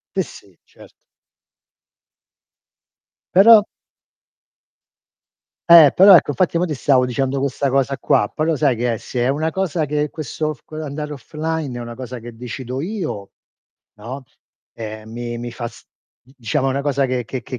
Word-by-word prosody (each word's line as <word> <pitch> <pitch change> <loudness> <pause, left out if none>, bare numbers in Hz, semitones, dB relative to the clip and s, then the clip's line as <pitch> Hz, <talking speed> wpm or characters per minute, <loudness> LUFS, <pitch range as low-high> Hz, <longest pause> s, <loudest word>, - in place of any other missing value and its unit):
Sì, - - +2
sì. - - -15
Cert - - -18 2.4
Però 210 +3 +8 2.1
Eh, 160 -5 +9
però 190 0 +9
ecco, 145 - +2
infatti 175 +2 0
mo' 175 - +2
ti 165 - -3
stavo 130 -2 +2
dicendo 135 +2 -1
questa 140 0 -1
cosa 135 +1 0
qua, 105 - +2
però 155 0 0
sai 140 -3 +2
che 120 0 -1
è - - -4
se 125 +3 -5
è - - +1
una 155 +4 0
cosa 180 -4 -1
che 150 +1 -1
questo 155 +1 -4
f 120 - -25
quell'andare 150 -1 -6
offline 155 -1 -4
è - - -5
una 120 0 -8
cosa 125 -1 -8
che 120 0 -10
decido 125 +2 -6
io, 165 - -5 0.7
no, 130 +6 -7 0.5
ehm, 110 -1 -8
mi 120 0 -5
mi 120 0 -6
fa 120 -2 -5
s - - -17 0.4
d 130 - -23
diciamo 130 +4 -1
è - - 0
una 135 +1 -1
cosa 140 -1 0
che 125 -2 -2
che 130 +1 -5
che 125 - -7
135 Hz, 165 wpm, -20 LUFS, 120-155 Hz, 2.4 s, Eh